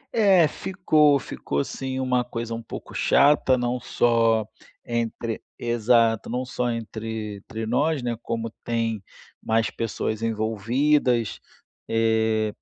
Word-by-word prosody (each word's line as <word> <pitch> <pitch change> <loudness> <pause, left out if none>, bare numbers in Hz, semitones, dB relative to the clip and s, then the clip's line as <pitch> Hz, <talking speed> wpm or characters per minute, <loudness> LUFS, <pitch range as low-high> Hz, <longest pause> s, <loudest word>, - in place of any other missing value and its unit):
É, 195 -7 +5
ficou 155 -4 +2
ficou 70 - -3
sim, 130 - -4
uma 125 -1 +1
coisa 115 -1 -5
um 115 - -4
pouco 115 - -9
chata, 140 -2 +4
não 125 0 -1
só 115 -3 +2 0.4
entre 115 -1 -3 0.2
exato, 115 -1 +2
não 125 +2 -2
só 125 -1 -2
entre 110 -2 -5
entre 110 +3 -6
nós, 140 +5 +1
né, 120 -1 -1
como 115 -1 -3
tem 115 -3 -1 0.4
mais 115 0 +1
pessoas 110 -1 -3
envolvidas, 115 +3 +1 0.5
eh, 110 -1 +1
115 Hz, 120 wpm, -24 LUFS, 110-125 Hz, 0.5 s, É